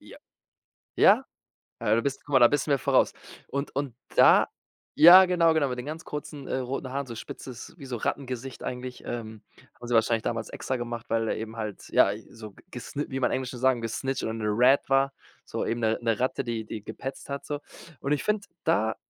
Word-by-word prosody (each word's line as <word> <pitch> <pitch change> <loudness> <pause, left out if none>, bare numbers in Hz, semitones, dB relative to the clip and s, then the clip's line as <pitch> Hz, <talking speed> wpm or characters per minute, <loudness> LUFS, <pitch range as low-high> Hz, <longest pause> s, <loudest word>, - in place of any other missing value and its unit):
Ja. - - -14 0.8
Ja? - - +6 0.6
Ja, 110 - +3
du 115 - +2
bist 140 -1 -3
guck 145 - -8
mal, 130 - +7
da 120 - +8
bist 145 0 0
du - - 0
mir 140 - +4
voraus. - - +3 0.3
Und 140 0 -4
und 135 -4 -2 0.2
da - - +6 0.5
ja, 175 +4 +10
genau, 170 -3 +3
genau, 150 -3 +2
mit 125 - -4
den 125 - -6
ganz 160 +2 -6
kurzen, 150 -1 -7
äh, - - -1
roten 130 +1 -3
Haaren 140 0 -2
so 115 - -7
spitzes, 115 +2 -9
wie 140 - -10
so 125 -2 -4
Rattengesicht 130 +1 -4
eigentlich, 125 0 -6
ähm 110 -2 -6 0.3
haben 120 - -10
sie 120 - +1
wahrscheinlich 115 0 +2
damals 115 -1 -3
extra 130 - -3
gemacht, 120 +1 -5
weil 115 0 +1
der - - -1
eben 110 +1 -6
halt, 105 -3 -5
ja, 100 - +5 0.2
so 110 -3 -11 0.2
gesni 140 +4 -5
wie 135 0 -3
man - - +2
im - - +1
Englischen 130 -1 -5
sagen 130 -2 +2
„gesnitcht“ 130 +4 -3
oder 110 - -2
'ne 110 -1 -4
„rat“ 130 +3 +4
war, 135 0 +3 0.3
so - - -3
eben 115 +1 -1
'ne 110 0 +1
'ne 115 -2 0
Ratte, 130 +1 0
die 115 -2 -3
die 105 -1 -7
gepetzt 135 +6 -7
hat 140 0 -5
so. 145 -1 -3 0.4
Und 140 - -2
ich 145 - -1
finde, 210 -1 0 0.2
da 110 -9 +2
130 Hz, 215 wpm, -27 LUFS, 115-140 Hz, 0.8 s, ja